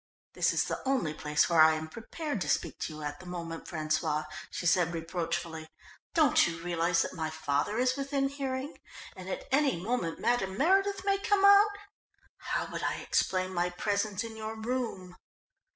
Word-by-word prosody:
"This - - +2
is - - +2
the - - -4
only 260 - 0
place 150 -1 +1
where 170 -2 +5
I 155 0 +7
am 160 0 -4
prepared 230 - -5
to - - -2
speak - - 0
to 155 - -4
you 155 - -8
at 145 0 -4
the 185 - -12
moment, 170 -2 -6
François," 155 -1 -1 0.2
she - - -5
said 175 -1 +3
reproachfully. 165 -1 -3 0.5
"Don't 310 - +5
you 165 -1 -4
realise 170 -1 +1
that - - -5
my 160 -3 -3
father 155 +5 -1
is 255 +1 +2
within 275 0 0
hearing, 275 +1 -4 0.4
and 185 -1 -8
at - - -5
any 275 - +3
moment 185 -4 -2
Madame 195 -6 0
Meredith 390 - +2
may 395 -1 +2
come 400 -1 +3
out? 405 +1 +7 0.6
How - - -2
would - - -4
I - - 0
explain 185 0 0
my 175 0 +1
presence 200 +2 -1
in 225 -1 -7
your 220 0 -5
room?" 220 -6 -4
185 Hz, 180 wpm, -30 LUFS, 165-265 Hz, 0.6 s, I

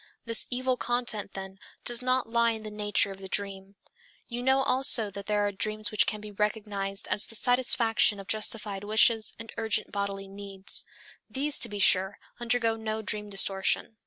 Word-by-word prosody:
This 230 -1 +4
evil 255 0 -1
content, 240 -5 -3
then, 190 0 -8 0.3
does 240 0 0
not 255 0 0
lie 235 0 +2
in 220 -1 -7
the 215 - -7
nature 205 -1 0
of 195 - -10
the 190 - -8
dream. 195 0 -4 0.5
You 240 0 -5
know 265 +1 +2
also 255 -6 +5
that 200 0 -8
there 210 -1 +1
are 205 - -1
dreams 215 +1 -2
which 215 - +2
can 215 - -2
be 210 0 -9
recognized 205 -1 -2
as 205 - -1
the 225 - -7
satisfaction 235 -3 +2
of 195 - -9
justified 210 -1 -4
wishes 220 +1 +3
and 225 0 -10
urgent 220 -1 -1
bodily 200 -1 -4
needs. 195 -1 +1 0.4
These, 285 +2 +1
to 235 - +2
be 205 - -4
sure, 190 0 +4 0.2
undergo 235 -1 +1
no 220 0 -4
dream 210 0 -3
distortion. 195 +2 -1
215 Hz, 180 wpm, -28 LUFS, 200-230 Hz, 0.5 s, also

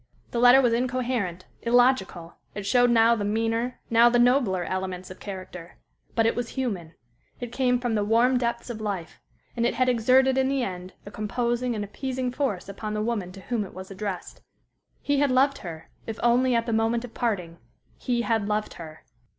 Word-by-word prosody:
The 235 - -1
letter 245 +2 +7
was 240 -2 +3
incoherent, 240 -7 -1 0.2
illogical; 235 -8 +2 0.2
it 205 -1 -5
showed 245 +3 +4
now 230 0 +5
the 220 -3 -1
meaner, 225 +3 -1
now 235 +1 +6
the 240 - +2
nobler 240 -7 +3
elements 185 0 -4
of 185 - -11
character; 185 -3 -9 0.4
but 225 - +3
it 225 - +2
was 240 -1 -3
human; 195 -11 -3 0.4
it 245 -2 -6
came 250 -1 +1
from 245 -2 -1
the 210 -1 +1
warm 235 +4 +3
depths 235 0 -2
of 220 -2 -7
life, 195 -6 -5 0.3
and 235 - -1
it 240 - +1
had 255 +1 +2
exerted 255 +2 +4
in 265 0 +2
the 270 -2 0
end 185 -2 -6
a 205 - -9
composing 240 +3 -1
and 210 - -3
appeasing 255 +4 -3
force 250 -10 -2
upon 210 +2 -5
the 210 - -1
woman 210 -6 -2
to 195 - -11
whom 230 +1 -2
it 190 - -11
was 190 +1 -9
addressed. 195 -2 -6 0.6
He 285 -1 +1
had 285 -1 +3
loved 270 +2 +3
her 165 -3 -9 0.2
if 225 -1 -5
only 245 +1 +3
at 230 0 +1
the 230 - -2
moment 225 +2 +1
of 235 - -13
parting 180 -8 -2 0.4
he 240 -2 -1
had 225 -4 0
loved 210 0 -1
her! 160 -2 -11
230 Hz, 195 wpm, -26 LUFS, 200-245 Hz, 0.6 s, letter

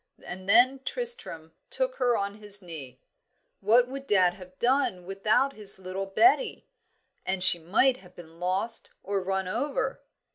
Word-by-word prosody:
And 185 +2 -8
then 255 +5 +5
Tristram 465 - -2 0.2
took - - -2
her 245 -2 +1
on 200 +1 -4
his 205 -1 +1
knee. 150 -9 -10 0.6
"What 235 +5 +4
would 270 +1 -8
dad 185 -5 +3
have 185 0 -14
done 240 -8 0
without 215 +8 +1
his 205 -4 -4
little 190 +1 -6
Betty? 365 - +2 0.6
and 185 -1 -1
she 175 -2 +8
might 220 +10 +2
have 180 -7 -18
been 165 -1 -14
lost 185 +6 -3
or 200 0 -2
run 190 0 -2
over." 275 +9 -3
195 Hz, 150 wpm, -27 LUFS, 185-250 Hz, 0.6 s, she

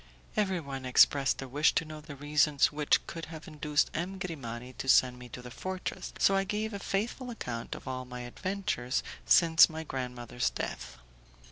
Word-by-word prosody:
Everyone 170 -10 -1
expressed 135 +2 +4
a - - -7
wish 145 +5 +3
to 165 - +2
know 155 0 -8
the 150 -1 -9
reasons 145 0 +3
which 150 0 +2
could 165 0 -6
have 160 -1 -10
induced 150 -1 0
M. 180 +4 -3
Grimani 130 -9 -6
to 135 - -3
send 125 -1 +5
me 125 0 -10
to 125 - -9
the 125 - -9
fortress, 185 +7 -5
so 195 - +4
I 195 - +3
gave 210 +2 -2
a 200 - -4
faithful 230 +7 -2
account 120 - -5
of - - -11
all 130 0 -4
my 125 0 -7
adventures 130 -2 -2 0.2
since 165 -1 +7
my 160 0 -5
grandmother's 125 -3 -3
death. 60 0 -5
150 Hz, 175 wpm, -30 LUFS, 125-175 Hz, 0.2 s, since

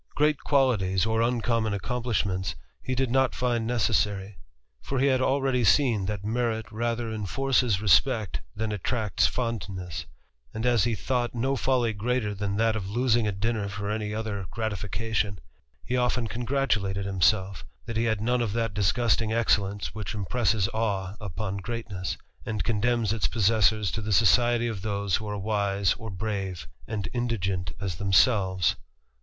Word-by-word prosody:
Great 150 0 +2
qualities, 105 -10 +2
or 110 0 +1
uncommon 115 -3 +1
plishments, 100 -5 -1 0.3
he 130 - -2
did 130 -1 0
not 130 0 +2
find 120 -2 0
necessary; 105 -4 0 0.5
for 135 - -3
he 130 - +3
had 130 -2 +3
aire 135 -2 +1
seen 110 -3 +3
that 100 -1 -4
merit 110 0 -1
rather 115 +1 -2
enforces 120 0 +1
respect 105 - +3
than 110 0 -2
attracn 105 +1 -3
Cs - - +6
fondness; 95 -8 -4 0.5
and 110 +2 -2
as 120 -3 +3
he 120 -2 0
thought 120 +4 -1
no 130 +4 0
folly 125 -3 +1
greater 110 0 -1
than 100 0 -2
that 115 0 +3
^oi 100 -4 -4
losing 120 -1 +2
a - - +1
dinner 105 +1 -1
for 100 +1 -4
any 105 -1 -2
other 105 -3 -3
gratification, 105 -1 -2 0.5
he 125 - -3
oftc^n 125 -1 +1
congratulated 115 -6 -1
himself, 95 0 +1 0.2
that 115 - -5
he 115 +1 +1
had 110 -2 0
none 120 +2 +1
of 110 -4 -1
that 115 -2 -1
disgustiMng 110 +2 +2
excellence 105 -3 +1
which 110 0 -5
impresses 105 -1 +1
awe 100 -4 -1
upon 100 0 -4
greatness, 100 -3 -4 0.3
and 105 -4 -2
co«3 105 +4 0
demns 120 -2 +2
its 110 - 0
possessors 110 -2 +2
to 110 - -3
the 105 0 -3
society 120 +3 +4
of 110 -5 -4
those 100 -2 0
who 110 - -7
are 105 - -3
wise 100 -1 +1
or 110 - -8
brave, 95 -2 -4 0.2
and 105 -4 -3
indigent 95 -8 -1
as 95 -5 -3
themselves. 95 -2 +3
110 Hz, 160 wpm, -27 LUFS, 100-120 Hz, 0.5 s, Cs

